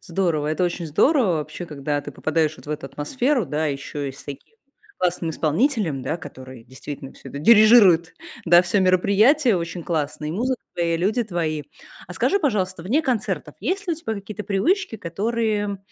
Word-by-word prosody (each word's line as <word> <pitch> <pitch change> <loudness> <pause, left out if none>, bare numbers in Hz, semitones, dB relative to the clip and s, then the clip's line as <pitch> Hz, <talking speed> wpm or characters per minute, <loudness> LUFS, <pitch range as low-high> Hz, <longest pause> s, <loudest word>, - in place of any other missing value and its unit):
Здорово, 165 -4 -1
это 155 +4 0
очень 175 -1 -2
здорово 225 - +3
вообще, 160 +3 -5
когда 145 -2 -3
ты - - -8
попадаешь 155 -1 -1
вот - - -16
в - - -6
эту 150 -2 -4
атмосферу, 245 - -1
да, 150 +3 -1
ещё 145 0 -4
и 135 - -4
с 135 - -14
таким 140 - -10 0.4
классным 175 -2 0
исполнителем, 160 - 0
да, 155 - -2
который 130 -6 -11
действительно 135 +2 -9
всё - - -13
это 140 - -6
дирижирует, 210 -3 +6 0.3
да, 175 +1 +7
всё 185 +3 +1
мероприятие 200 - +4
очень 170 0 -4
классно, 155 -2 -2
и - - -3
музыка 245 +8 -1
твои, 170 -1 0
и - - +1
люди 210 +7 +1
твои. 165 -7 -2 0.4
А - - -8
скажи, 400 - +2
пожалуйста, 190 - -1
вне 250 - +1
концертов, 245 -8 -2
есть 390 +2 -2
ли 345 - 0
у - - -13
тебя 265 -9 -4
какие-то 210 +1 -7
привычки, 335 - 0
которые 205 +2 -2
180 Hz, 180 wpm, -22 LUFS, 155-220 Hz, 0.4 s, да